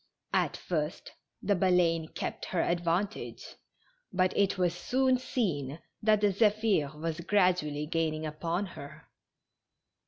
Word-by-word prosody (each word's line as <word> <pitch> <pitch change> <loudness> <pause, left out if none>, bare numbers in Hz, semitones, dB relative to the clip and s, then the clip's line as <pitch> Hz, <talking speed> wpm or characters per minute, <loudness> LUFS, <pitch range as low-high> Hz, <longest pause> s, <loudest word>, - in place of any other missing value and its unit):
At - - +1
first 155 -2 -3 0.3
the 205 - +3
Baleine 175 -3 +3
kept - - -5
her 180 - 0
advantage, 175 +4 -1 0.7
but 185 0 +1
it 200 -1 +2
was 180 -2 +2
soon 255 +7 +1
seen 160 - -2 0.2
that 215 -1 +3
the 205 -2 +3
Zephir 205 -8 +2
was 165 0 -3
gradually 175 -6 +2
gaining 160 -1 -1
upon 165 +5 -2
her. 145 -6 -10
175 Hz, 120 wpm, -30 LUFS, 155-205 Hz, 0.7 s, the